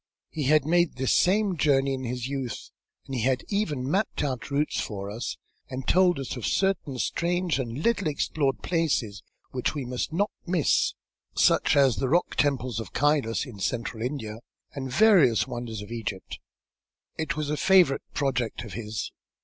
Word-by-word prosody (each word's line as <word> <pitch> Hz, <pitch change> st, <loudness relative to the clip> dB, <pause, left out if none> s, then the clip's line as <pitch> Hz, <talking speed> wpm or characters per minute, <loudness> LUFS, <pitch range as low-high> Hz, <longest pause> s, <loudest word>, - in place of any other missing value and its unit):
He 150 Hz, -3 st, -3 dB
had 150 Hz, 0 st, +4 dB
made 170 Hz, +1 st, +3 dB
this 130 Hz, 0 st, +1 dB
same 195 Hz, +1 st, +3 dB
journey 135 Hz, -3 st, +3 dB
in 130 Hz, -1 st, -4 dB
his 125 Hz, +1 st, -3 dB
youth, 135 Hz, -4 st, -5 dB, 0.3 s
and 135 Hz, -, -8 dB
he 125 Hz, -, -1 dB
had 130 Hz, +2 st, +1 dB
even 155 Hz, -11 st, -1 dB
mapped 195 Hz, +5 st, 0 dB
out 130 Hz, -4 st, -3 dB
routes 145 Hz, +2 st, 0 dB
for 100 Hz, -2 st, -5 dB
us, 110 Hz, +1 st, -4 dB, 0.3 s
and 130 Hz, 0 st, -6 dB
told 180 Hz, -1 st, +4 dB
us 135 Hz, -1 st, -4 dB
of 125 Hz, -, -7 dB
certain 190 Hz, -9 st, 0 dB
strange 175 Hz, +3 st, 0 dB
and 125 Hz, +3 st, -4 dB
little 230 Hz, -6 st, +2 dB
explored 145 Hz, -2 st, -1 dB
places 135 Hz, -, 0 dB, 0.3 s
which 130 Hz, +3 st, -1 dB
we 140 Hz, -3 st, -3 dB
must 125 Hz, +4 st, -3 dB
not 200 Hz, +6 st, 0 dB
miss, 175 Hz, -4 st, +2 dB, 0.4 s
such -, -, +4 dB
as 135 Hz, -6 st, +4 dB
the 130 Hz, +6 st, 0 dB
rock 175 Hz, +5 st, +2 dB
temples 130 Hz, -5 st, 0 dB
of 105 Hz, -7 st, -7 dB
Kylas 145 Hz, -5 st, +1 dB
in 120 Hz, -7 st, -10 dB
Central 115 Hz, +2 st, -2 dB
India, 115 Hz, -4 st, -4 dB, 0.3 s
and 135 Hz, -2 st, -5 dB
various 170 Hz, -, +5 dB
wonders 120 Hz, -4 st, -5 dB
of 105 Hz, -, -11 dB
Egypt. 110 Hz, -5 st, -5 dB, 0.8 s
It 160 Hz, +1 st, -2 dB
was 150 Hz, -1 st, -2 dB
a -, -, +1 dB
favourite 180 Hz, -4 st, +4 dB
project 125 Hz, -6 st, -1 dB
of 110 Hz, -6 st, -9 dB
his. 110 Hz, +1 st, -4 dB
135 Hz, 170 wpm, -26 LUFS, 120-160 Hz, 0.8 s, various